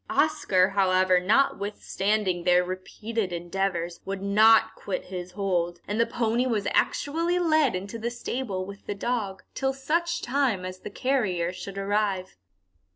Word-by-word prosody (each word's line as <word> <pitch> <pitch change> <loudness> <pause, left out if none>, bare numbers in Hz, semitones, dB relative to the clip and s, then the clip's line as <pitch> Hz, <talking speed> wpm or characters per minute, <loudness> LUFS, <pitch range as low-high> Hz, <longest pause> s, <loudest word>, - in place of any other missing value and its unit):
Oscar, 205 -12 +3
however, 185 -2 +3
notwithstanding 200 -3 0
their 180 0 +4
repeated 185 +3 -4
endeavours, 175 0 -2
would 195 0 -5
not 220 +2 +5
quit 195 - -4
his 180 -1 -7
hold, 175 -3 -1
and 210 +2 -2
the 230 - +2
pony 235 +2 0
was 215 -5 0
actually 335 +4 +1
led 310 - +3
into 200 +5 -5
the 230 +2 -2
stable 240 -5 -4
with 200 +1 -11
the 205 - -2
dog, 205 -3 -2
till 270 0 0
such 335 +5 -1
time 245 -8 0
as 185 0 -6
the - - -7
carrier 200 -9 0
should 195 +1 -8
arrive. 195 -2 -1
200 Hz, 145 wpm, -26 LUFS, 185-240 Hz, -, not